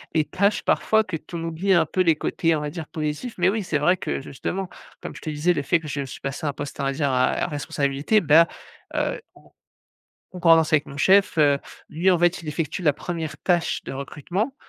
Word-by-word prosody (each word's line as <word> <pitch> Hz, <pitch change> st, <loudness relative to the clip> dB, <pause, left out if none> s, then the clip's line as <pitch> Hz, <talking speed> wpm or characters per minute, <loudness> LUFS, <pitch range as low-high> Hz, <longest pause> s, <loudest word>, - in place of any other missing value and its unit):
les 155 Hz, -1 st, +3 dB
tâches 200 Hz, +5 st, +1 dB
parfois, 220 Hz, 0 st, +2 dB
que 185 Hz, -4 st, -5 dB
tu 165 Hz, +3 st, -11 dB
en 165 Hz, -, -4 dB
oublies 170 Hz, +4 st, 0 dB
un 165 Hz, -2 st, +4 dB
peu 185 Hz, -, -1 dB
les 165 Hz, -3 st, +4 dB
côtés, 165 Hz, +1 st, 0 dB
on 150 Hz, -, -2 dB
va 150 Hz, -, -3 dB
dire 165 Hz, -2 st, -7 dB
positifs. 155 Hz, +10 st, -4 dB
Mais 180 Hz, +1 st, +3 dB
oui, 215 Hz, +1 st, -1 dB
c'est 165 Hz, -4 st, -1 dB
vrai 175 Hz, +5 st, +3 dB
que, 180 Hz, -, -4 dB
justement 180 Hz, +8 st, -5 dB, 0.3 s
comme -, -, -7 dB
je -, -, -10 dB
te 155 Hz, -, -5 dB
disais, 155 Hz, +4 st, +1 dB
le 145 Hz, -, -1 dB
fait 170 Hz, +4 st, +2 dB
que 155 Hz, -, -10 dB
je 140 Hz, -1 st, -3 dB
suis 135 Hz, -, -9 dB
passé 140 Hz, +5 st, -5 dB
un 145 Hz, -, -1 dB
poste, 145 Hz, -1 st, -7 dB
on -, -, -1 dB
va 135 Hz, -, +1 dB
dire 140 Hz, -1 st, 0 dB
à 130 Hz, 0 st, +1 dB
responsabilité, 145 Hz, +5 st, 0 dB
bah, 165 Hz, +2 st, +6 dB, 0.5 s
heu, -, -, -1 dB
en -, -, -18 dB, 0.9 s
concordance 165 Hz, -3 st, +4 dB
avec 145 Hz, -2 st, +3 dB
mon 140 Hz, -, -10 dB
chef, 195 Hz, +5 st, +4 dB
heu, 145 Hz, -2 st, +4 dB, 0.3 s
lui 175 Hz, +5 st, +2 dB
en 175 Hz, -, +3 dB
fait 175 Hz, +1 st, +2 dB
il 155 Hz, -, -8 dB
effectue 155 Hz, +3 st, -3 dB
la 150 Hz, -4 st, +4 dB
1re 160 Hz, -2 st, -5 dB
tâche 175 Hz, -2 st, 0 dB
de -, -, -6 dB
recrutement, 175 Hz, -, -3 dB
160 Hz, 230 wpm, -23 LUFS, 145-180 Hz, 0.9 s, bah